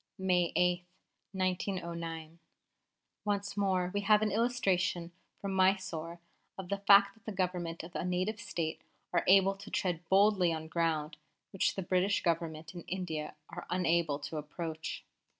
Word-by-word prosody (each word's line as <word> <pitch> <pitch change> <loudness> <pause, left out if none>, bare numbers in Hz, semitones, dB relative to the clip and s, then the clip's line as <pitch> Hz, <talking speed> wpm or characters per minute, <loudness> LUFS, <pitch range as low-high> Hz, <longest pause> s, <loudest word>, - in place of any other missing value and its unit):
'" - - -56
May 180 -3 +2
8, 180 0 +2 0.5
1909. 170 -3 -3 0.8
"Once 200 -1 -1
more 190 -3 +1
we 205 - 0
have 210 +1 +4
an 215 - +1
illustration 190 -6 +1 0.3
from 195 -1 -3
Mysore 185 -3 +1 0.4
of 190 -2 -7
the 200 - -1
fact 200 0 +6
that 225 +1 -26
the 220 - -4
Government 180 -4 -2
of 170 +2 -10
a - - -2
Native 185 +4 -1
State 160 -5 -3 0.3
are - - +3
able 195 +1 +6
to 200 +1 -10
tread 175 -4 -1
boldly 195 -2 +5
on 160 -1 -4
ground 160 -2 -1 0.3
which 195 - +1
the 195 - -3
British 185 +3 +1
Government 165 -1 -1
in 175 - -7
India 160 -5 -4
are - - -8
unable 170 -4 +1
to 150 +2 -6
approach. 160 +1 -5
180 Hz, 150 wpm, -32 LUFS, 165-195 Hz, 0.8 s, fact